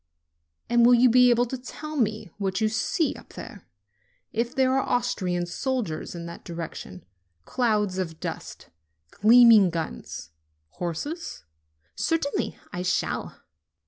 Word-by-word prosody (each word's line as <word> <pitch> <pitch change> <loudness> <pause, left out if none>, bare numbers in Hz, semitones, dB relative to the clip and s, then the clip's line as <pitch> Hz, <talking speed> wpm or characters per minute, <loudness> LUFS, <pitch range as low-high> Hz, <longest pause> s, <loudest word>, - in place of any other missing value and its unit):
"And 240 0 +4
will 245 +1 +7
you 245 0 +5
be 250 +1 +6
able 240 0 +4
to 255 +1 -5
tell 305 +4 -8
me 215 - -1
what 190 -1 -1
you 220 -1 +2
see 305 +8 0
up - - -14
there - - -10 0.7
if 235 +2 -1
there 260 -1 +3
are 270 - +3
Austrian 185 -9 -1
soldiers 215 - -3
in 170 -1 -6
that 170 0 -9
direction, 165 - -7 0.4
clouds 210 -6 0
of 165 -4 -4
dust, - - -7 0.4
gleaming 225 -2 +7
guns, 160 - -5 0.4
horses 180 - -5 0.3
?" 75 +2 -44
"Certainly 325 -3 -1 0.2
I 180 - -3
shall." 180 0 -2
220 Hz, 135 wpm, -26 LUFS, 175-245 Hz, 0.7 s, will